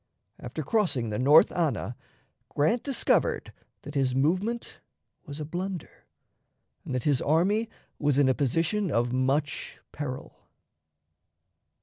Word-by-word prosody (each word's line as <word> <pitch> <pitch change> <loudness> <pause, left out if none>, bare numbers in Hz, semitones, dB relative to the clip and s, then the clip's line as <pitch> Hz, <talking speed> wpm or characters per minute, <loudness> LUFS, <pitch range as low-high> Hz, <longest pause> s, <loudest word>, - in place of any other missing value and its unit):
After 125 +6 -5
crossing 140 - 0
the 105 - -2
North 145 +5 +6
Anna, 155 -7 -1 0.5
Grant 190 +12 +1
discovered 275 -3 +1 0.3
that 145 - -8
his 135 -3 +1
movement 185 - -1 0.5
was 145 +1 -7
a 150 - -4
blunder, 180 +2 -6 0.8
and 130 - -4
that 125 - -2
his 145 -4 +2
army 195 +9 +2 0.3
was 145 -2 +1
in 140 -2 +4
a 130 - +4
position 165 - 0
of 120 -1 0
much 135 +3 -1
peril. 135 -3 -7
150 Hz, 120 wpm, -27 LUFS, 130-180 Hz, 0.8 s, North